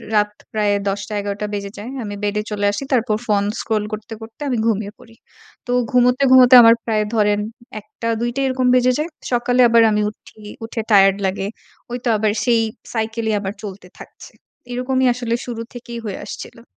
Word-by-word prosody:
রাত 210 0 +3 0.2
প্রায় 210 -1 +1 0.2
১০ 195 +1 -2
টা, - - -5
১১ 200 0 -4
টা 210 - -1
বেজে 200 -1 -4
যায় 220 +5 -7
আমি 205 -1 -5
বেডে 205 +1 0
চলে 205 -1 -1
আসি 205 - -4
তারপর 225 -3 +1
phone 205 -1 +2
scroll 215 -2 -1
করতে, 215 +1 -6
করতে 225 +5 -12
আমি 250 - 0
ঘুমিয়ে 210 -2 -1
পড়ি। 225 0 -17 0.5
তো 245 - -2 0.2
ঘুমোতে, 250 +1 +3
ঘুমোতে 255 -1 +8
আমার 230 0 +7
প্রায় 215 -2 +1
ধরেন 210 -1 +2 0.4
১ 210 - -19 0.2
টা, 230 - -1
২ 240 - 0
টা 275 - -1
এরকম 255 -1 0
বেজে 255 0 +4
যায়। 320 +3 -2 0.2
সকালে 245 +1 +2
আবার 230 0 +5
আমি 210 0 +1
উঠি, 215 - -17 0.3
উঠে 225 0 -4
টায়ারড 195 -1 +6
লাগে 195 +1 -3 0.4
ওই 245 - -2
তো - - +2
আবার 210 0 +1
সেই 235 -2 +3 0.3
cycle 225 0 -2
এই - - +1
আবার 195 0 -4
চলতে 195 -3 -8
থাকছে। - - -13 0.4
এরকমই 260 +1 0
আসলে 240 -1 -2
শুরু 235 -2 -5
থেকেই 235 -1 -7
হয়ে 200 - -4
আসছিলো। 230 - -9
225 Hz, 195 wpm, -19 LUFS, 205-245 Hz, 0.5 s, ঘুমোতে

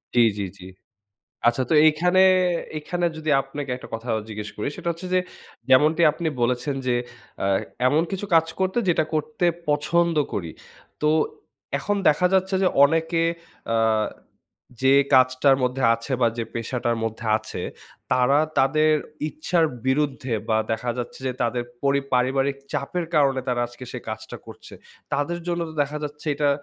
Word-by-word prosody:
জি, - - +5 0.2
জি, - - -1 0.2
জি। - - -11 0.8
আচ্ছা, 120 +2 +3
তো - - +3
এইখানে 180 +4 +3 0.6
এইখানে 175 +3 -3
যদি 155 0 -2
আপনাকে 135 0 -6
একটা - - -11
কথা 115 +2 -6
আ - - 0
জিজ্ঞেস 105 -1 -6
করি, 105 - -2
সেটা 170 - -4
হচ্ছে 175 +3 -9
যে, 185 - +4 0.5
যেমনটি 155 +6 +5
আপনি 160 0 -2
বলেছেন 125 +4 0
যে, 125 - +2 0.4
অ্যা 95 - -1 0.4
এমন 150 +5 +3
কিছু 195 +1 -3
কাজ 165 0 +5
করতো, 190 +5 +1
যেটা 160 -2 +3
করতে 155 +3 -1 0.2
পছন্দ 170 +3 +2 0.2
করি। 85 -5 -3 0.5
তো 150 - +3 0.7
এখন 205 0 -1
দেখা 155 +4 +3
যাচ্ছে 190 +1 +2
যে 185 - +5 0.2
অনেকে 165 +2 +1 0.5
অ্যা 110 -1 +2 0.8
যে 135 +1 +5 0.2
কাজটার 130 +1 +5
মধ্যে 125 +1 -1
আছে 115 +4 -6
বা, 120 - +4
যে 115 - -1
পেশাটার 120 0 -2
মধ্যে 115 +1 -4
আছে, 110 - -7 0.5
তারা 130 +3 +4 0.2
তাদের 155 +3 +3 0.4
ইচ্ছার 160 +3 0 0.2
বিরুদ্ধে 135 -3 0
বা, 110 - +3 0.2
দেখা 120 +2 -2
যাচ্ছে 120 - -5
যে 130 - 0
তাদের 120 +1 0 0.2
পরি 140 0 +2
পারিবারিক 135 +2 +1 0.2
চাপের 170 +5 -2
কারণে 135 -3 +3
তারা 120 -1 0
আজকে 120 +1 -11
সে 125 - -4
কাজটা 110 0 -6
করছে। - - -12 0.4
তাদের 160 +5 -1
জন্য 175 -1 -1
তো - - -11
দেখা 150 +2 -4
যাচ্ছে 150 +2 -8
এটা 145 0 +1
140 Hz, 160 wpm, -24 LUFS, 125-160 Hz, 0.8 s, জি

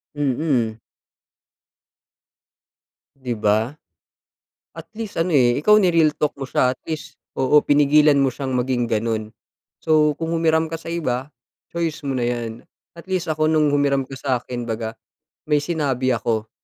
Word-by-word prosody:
Mm. 130 -5 0 2.4
Di 125 -4 -4
ba? 105 +3 +2 1.1
At - - -9
least 220 -4 -6
ano, 165 -1 0
eh, 120 -2 +4
ikaw 210 +8 +5
ni-real 165 -4 +3
talk 150 0 -1
mo 135 - -4
siya. 130 0 +1
At - - -38
least 155 -2 -6 0.2
oo, 135 +3 +4
pinigilan 145 0 +4
mo 135 -1 +3
siyang 130 0 -4
maging 125 -1 0
ganun. 110 -1 -2 0.5
So, 155 -1 +3
kung 165 +2 -4
humiram 160 -1 +1
ka 165 - -4
sa 165 - -8
iba, 140 -5 -2 0.4
choice 165 -2 -3
mo 135 - -1
na 125 - -1
'yan. 120 -2 -2 0.4
At 170 +3 -13
least 185 -2 -1
ako 155 0 +1
nung 155 -2 +3
humiram 140 -2 +1
ka 135 - -9
sa'kin 125 -2 -3
'baga 110 0 -4 0.5
may 150 -1 +2
sinabi 140 -5 -1
ako. 110 -2 -1
140 Hz, 150 wpm, -21 LUFS, 125-155 Hz, 2.4 s, ikaw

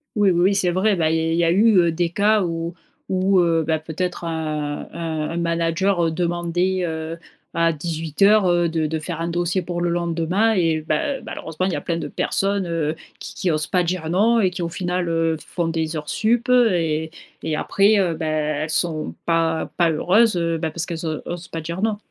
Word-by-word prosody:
Oui 205 -2 +4
oui 175 -2 +2
oui, 195 +3 +3
c'est 185 -2 +2
vrai. 190 +4 +2
Bah, 160 -3 +1
il 160 - +1
y - - +1
a 165 0 0
il 165 - +1
y 170 - +3
a 165 - +3
eu 190 -3 +4
des 170 +1 0
cas 210 +2 +3
où 165 0 -3 0.3
où, 190 0 +3
heu 165 -2 +2
bah, 160 -1 +1
peut-être, 170 +3 -4
heu - - -2
heu, 155 -2 -3
un 160 0 -3
manager 170 +1 +1
demandait, 175 +2 0
heu, 160 0 -4 0.4
à 165 0 +3
18:00 165 +6 +2
heu, 175 -1 +2
de 160 -1 -1
de 160 +1 -2
faire 165 +1 -5
un 165 - -1
dossier 175 +2 -1
pour 175 0 -4
le 175 - +1
lendemain 170 +5 +1
et 165 -5 +1
ben, 155 - -1
malheureusement, 165 +3 -4
il 190 - -1
y - - 0
a - - -3
plein 170 - -2
de 170 - -4
personnes, 195 -1 -1
heu, 160 -2 -1 0.2
qui - - -8
qui 185 - -1
osent 155 -1 0
pas 180 - +1
dire 175 -2 -2
non 225 +6 +3
et 190 -4 +2
qui, 180 - -5
au 170 - -2
final, 180 0 -2
heu, 165 -1 +1
font 170 -2 -2
des 160 -1 -2
heures 150 -1 -5
sup. 235 +3 +1
Et 170 -11 +2 0.3
et 160 -1 -2
après, 200 +6 +3
heu 180 -4 +1
bah, 160 0 -4
elles 155 0 -1
sont 155 -1 -1
pas 165 -1 +1
pas 170 -2 +4
heureuses, 190 +7 +3
heu 165 -1 0
ben, 160 - -1
parce 165 +2 -3
qu'elles 165 -1 -5 0.2
osent 175 0 -6
pas 165 - -5
dire 170 +4 -5
non. 215 -1 +1
170 Hz, 215 wpm, -22 LUFS, 160-185 Hz, 0.4 s, Oui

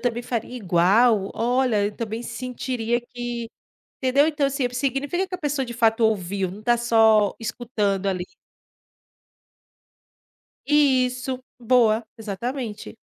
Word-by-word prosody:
também 240 -1 -1
faria 240 0 -4
igual. 200 +2 +3
Olha, 240 -3 +1
eu 205 - -6
também 225 0 -4
sentiria 240 -1 -3
que", 240 -1 -6 0.5
entendeu, 275 +3 +3
então, 295 -3 +1
assim, 275 -1 0
significa 275 +8 -1
que 370 - -6
a - - -4
pessoa 290 -3 -1
de 240 - -6
fato 225 -1 +2
ouviu, 195 -3 0
não 205 +3 -10
tá 240 +1 +3
só 225 -3 +4
escutando 210 -4 -2
ali. 185 -2 -1 2.4
Isso, 260 -3 +2 0.2
boa, 230 -2 +3
exatamente. 220 +1 -5
240 Hz, 120 wpm, -23 LUFS, 215-255 Hz, 2.4 s, só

